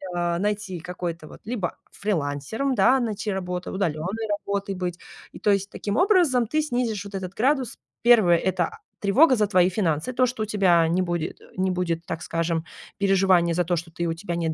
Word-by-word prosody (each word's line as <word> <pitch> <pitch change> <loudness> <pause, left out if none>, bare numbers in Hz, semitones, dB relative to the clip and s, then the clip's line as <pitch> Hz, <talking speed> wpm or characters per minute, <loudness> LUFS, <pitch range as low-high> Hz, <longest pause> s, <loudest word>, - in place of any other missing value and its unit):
а, 175 -1 0
найти 205 -2 -2
какой-то, 170 -2 -5
вот, - - -12
либо 215 -6 -3 0.2
фрилансером, 195 - -2
да, 265 +2 +4
найти 215 -3 -2
работу, 180 -2 -4
удалённой 190 +4 -2 0.2
работой 200 0 -2
быть. 180 -1 -4 0.3
И - - -11
то 210 - +2
есть, 195 0 +1
таким 205 0 -3
образом 350 - +3
ты 310 +7 +1
снизишь 240 -8 -2
вот 200 0 -8
этот 190 -1 -5
градус. 260 +3 0 0.2
Первое, 220 -8 +6
это, 185 +1 0
а, - - -10 0.2
тревога 255 +8 +5
за 210 -1 +2
твои 185 -3 +4
финансы, 170 0 -1
то, 255 +1 +3
что 250 -3 -2
у - - -1
тебя 190 -5 +3
не 180 +3 +2
будет, 175 -3 -3
э, - - -16
не 185 0 +1
будет 170 -2 -2
так 165 -1 -5
скажем, 165 0 -1 0.3
переживания 190 -3 +3
за 175 +1 +1
то, 175 +1 +1
что 165 +1 -5
ты, 170 +1 -3
у 165 - 0
тебя 170 +1 -5
нет 165 -1 -1
190 Hz, 200 wpm, -24 LUFS, 170-215 Hz, 0.3 s, Первое